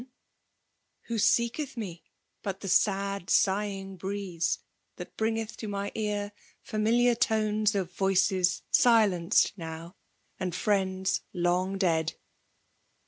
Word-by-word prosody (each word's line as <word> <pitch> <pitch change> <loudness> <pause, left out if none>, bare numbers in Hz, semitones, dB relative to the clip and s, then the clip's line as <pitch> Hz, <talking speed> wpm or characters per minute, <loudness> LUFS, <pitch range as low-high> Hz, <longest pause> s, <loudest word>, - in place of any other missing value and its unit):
en? 250 - -13 1.0
Who 230 -2 -3
seeketh 240 +6 +1
me 180 -7 -6 0.4
but 195 -1 -4
the 195 - -5
sed 195 -1 +1
sighing 195 -2 +1
breeie 190 -3 -2 0.4
That - - -9
bringeth 225 0 -2
to 220 - -6
my 200 0 -3
ear 205 -1 -2 0.3
familiar 235 +3 +2
toaes 215 -2 +1
Of 180 -3 -2
Toices 190 -1 +2
silenced 215 - +4
aow, 165 +1 -7 0.5
and 180 -2 -2
friends 190 -1 0
long 180 +2 0
dead 160 -4 +1
200 Hz, 110 wpm, -28 LUFS, 185-215 Hz, 1.0 s, silenced